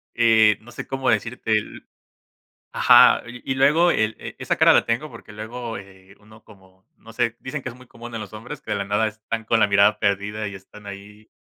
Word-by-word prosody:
eh, 110 -3 +4
no 120 +2 -15
sé - - -7
cómo 135 -1 -2
decirte 115 -1 -2
el 105 0 -3 0.9
ajá, - - +6
y 125 +2 -6
y - - -2
luego 155 +6 +4
el, 110 -5 0
eh, - - -9
esa - - -2
cara - - +5
la - - +4
tengo, 120 +7 -2
porque, 115 -2 -13
luego, 115 +2 -7
eh, 95 0 -16
uno 110 +1 -19
como, 95 -2 -21
no 115 - -15
sé, 115 -1 -1
dicen 135 +1 -6
que 130 - -5
es 115 - -13
muy 130 0 -17
común 120 0 -11
en 115 - -4
los - - -9
hombres 125 +6 -9
que 105 - -6
de - - 0
la 100 - -3
nada 105 +2 0
están 110 +1 -6
con 115 -1 +2
la - - +5
mirada 100 +1 +3
perdida 105 +2 -1
y 100 - -7
están 100 +2 -14
ahí 105 +2 -12
110 Hz, 225 wpm, -22 LUFS, 105-120 Hz, 0.9 s, ajá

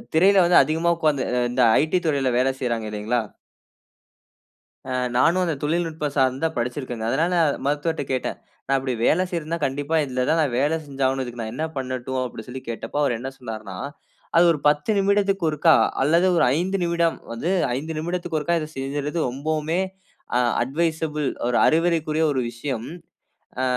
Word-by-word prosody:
திரையில 190 +3 +6
வந்து 175 0 +5
அதிகமா 165 +2 +1
உட்கார்ந்து 155 -5 +1 0.3
இந்த 125 +1 +1 0.2
ஐடி 160 +4 +1
இத் 175 - -12
துறையில 140 -4 +1
வேல 130 +1 +3
செய்றாங்க 115 -3 -1
இல்லைங்களா. 110 +3 -1 1.7
ஆ - - -1 0.2
நானும் 170 +8 +3
அந்த 165 - 0
தொழில்நுட்பம் 155 -2 -1
சார்ந்த 135 +2 +1
படிச்சிருக்கேங்க. 120 -1 -3
அதனால 165 +8 +1 0.3
மருத்துவர்ட்ட 150 +2 -1
கேட்டேன். 130 - -2 0.3
"நான் 135 +1 +2
இப்பிடி 130 -1 -2
வேலை 180 +3 +3
செய்றதுன்னா, 170 -1 -3
கண்டிப்பா 145 +4 -2
இதுல 130 -1 -1
தான், 160 +1 +3
நான் 140 -5 0
வேல 150 +4 +2
செஞ்சாகணும். 135 -1 0
இதுக்கு 120 -1 -7
நான் 110 0 -5
என்ன 155 +6 -2
பண்ணட்டும்"அப்பிடி 130 -2 -4
சொல்லி 130 +1 -7
கேட்டபோ 115 +3 -5
அவரு 120 -5 +1
என்ன 130 +3 -4
சொன்னார்ன்னா! 110 -6 -7 0.6
அது 170 - +7
ஒரு 155 - -1
10 150 +7 +2
நிமிடத்திக்கு 195 -2 +2
ஒருக்கா, 155 +1 +4 0.3
அல்லது 165 +6 +3
ஒரு - - +4
5 190 +3 0
நிமிடம் 170 -1 +1
வந்து 115 +9 -3 0.3
5 155 +5 -4
நிமிடத்துக்கு 170 0 -2
ஒருக்கா 170 +3 0
இத 155 - -4
செஞ்சிர்றது 145 +4 -3
ரொம்பவுமே, 155 +5 -2 0.6
அ - - +4 0.2
அட்வைசபிள், 155 0 -1 0.2
ஒரு 120 - +1
அறிவுரைக்குரிய, 160 -1 +2
ஒரு 130 - 0
விஷயம். 120 0 -4 0.7
ஆ - - 0
150 Hz, 155 wpm, -23 LUFS, 130-165 Hz, 1.7 s, அது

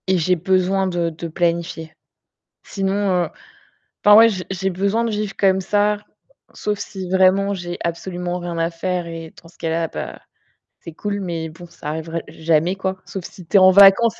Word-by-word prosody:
Et 190 0 +3
j'ai 180 +2 +2
besoin 190 +2 +1
de 175 -2 -1
de 165 +1 -7
planifier. 170 -1 -2 0.7
Sinon, 195 0 -1
heu, - - -5 0.8
enfin, 205 0 +8
ouais, 230 +1 +8
j'ai 185 -4 -4
j'ai 190 0 -1
besoin 200 +5 0
de 230 - -1
vivre 210 -1 -3
comme 190 -1 +3
ça, 205 +2 +1 0.6
sauf 210 -1 -3
si 190 -3 -6
vraiment 190 +2 +3
j'ai 175 -2 -5
absolument 175 +1 -3
rien 175 -1 -5
à 165 +1 0
faire 180 +1 -2
et 165 -1 -8
dans 165 - -16
ce 170 - -20
cas-là, 165 0 -1
bah - - -7 0.6
c'est 165 - -10
cool, 205 +4 -3
mais 170 -4 -4
bon, 165 +3 -12
ça 150 - -11
arriverait 160 +1 -4
jamais 160 +3 +1
quoi, 190 0 -3
sauf 190 -3 -7
si 180 - -11
tu 180 - +3
es - - +8
en 185 0 +7
vacances 200 +4 +6
185 Hz, 185 wpm, -20 LUFS, 170-195 Hz, 0.8 s, enfin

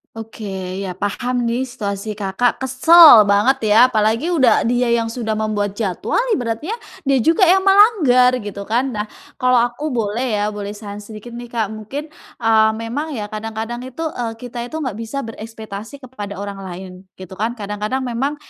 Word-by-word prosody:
Oke, 225 0 -9 0.4
ya 190 - -4
paham 240 +6 -2
nih 240 +3 0
situasi, 210 -4 -5
Kakak, 200 +5 0
kesel 265 0 +8
banget 210 +7 +3
ya, 210 - +5
apalagi 225 +4 +1
udah 265 -5 +4
dia 245 0 +1
yang 230 -1 +1
sudah 225 -2 -3
membuat 210 -2 -1
jadwal 195 - -1 0.2
ibaratnya, 245 - -3 0.3
dia 275 - +4
juga 335 - +4
yang 380 +2 +4
melanggar 375 - +5
gitu 200 -1 -7
kan. 245 +4 0
Nah 210 -2 -3 0.3
kalau 255 0 +3
aku 245 +5 -3
boleh 230 -2 -1
ya, 210 0 -1
boleh 205 0 -6
saran 205 -1 -8
sedikit 215 +2 -10
nih, 240 +1 -8
Kak, 225 -3 -2
mungkin, 270 +8 -7 0.3
eee, 220 -1 +4
memang 265 +7 -4
ya 210 -3 -5
kadang-kadang 225 +2 -5
itu, 260 +6 -6
eee, 235 -5 -4
kita 240 0 -7
itu 280 - -9
nggak 245 -7 -4
bisa 250 +5 -4
berekspektasi 225 +3 -9
kepada 210 -6 -7
orang 200 0 -6
lain 185 +1 -8 0.2
gitu 185 -1 -11
kan. 225 +3 -1
Kadang-kadang 210 +4 -3
memang 260 +4 -2
230 Hz, 170 wpm, -19 LUFS, 210-255 Hz, 0.4 s, kesel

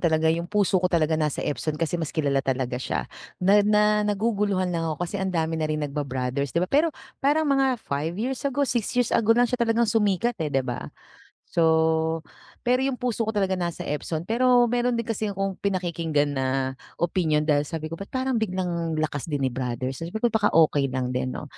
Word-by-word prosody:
talaga 160 -1 +3
yung 170 +1 -3
puso 200 -3 +2
ko 180 - +2
talaga 165 -3 +1
nasa 155 -2 0
Epson 150 +1 -2
kasi 170 +1 -1
mas 160 - -2
kilala 140 -4 0
talaga 130 -2 -2
siya. 60 - -2 0.3
Na 195 +3 +4
na 210 0 +3
naguguluhan 205 -3 0
lang 165 -1 -1
ako 160 +3 -2
kasi 195 +3 -4
ang 190 - 0
dami 160 -2 -1
na 155 - 0
rin 155 -1 -1
nagba-brothers 140 0 -3
di - - +4
ba? 185 - -9
Pero 300 +4 +3 0.3
parang 295 +3 +2
mga 270 -3 +2
5 150 +5 -2
years 250 +5 -2
ago 280 +2 0
6 240 -5 -1
years 245 -2 +2
ago 225 0 +4
lang 245 - +5
siya 245 0 -2
talagang 235 0 +3
sumikat, 220 +2 +1
eh, 155 - 0
di 135 -2 0
ba? 125 -1 -4 0.6
So 160 0 +2 0.4
pero 250 +1 +3
yung 265 -1 0
puso 240 -3 -2
ko - - +3
talaga 195 -2 +1
nasa 170 -1 -3
Epson, 155 +2 -3
pero 245 +3 +4
mayro'n 245 0 +1
din 235 - -1
kasi 220 -2 -2
akong 195 -1 -3
pinakikinggan 170 -6 0
na 135 -1 -1 0.5
opinyon 160 -3 +1
dahil 150 -2 +3
sabi 155 -1 -5
ko, - - -1
"ba't 200 - -6
parang 260 -3 -1
biglang 175 -5 -2
lakas 155 -1 -2
din 145 -3 -1
ni 130 - 0
brother?" 130 0 -3
Sabi 165 +8 -6
ko 235 +1 +1
"Baka 220 -2 +3
okey 150 -4 +3
lang 130 -1 -2
din 130 +1 -1
'no?" - - -6
170 Hz, 205 wpm, -25 LUFS, 155-220 Hz, 0.6 s, lang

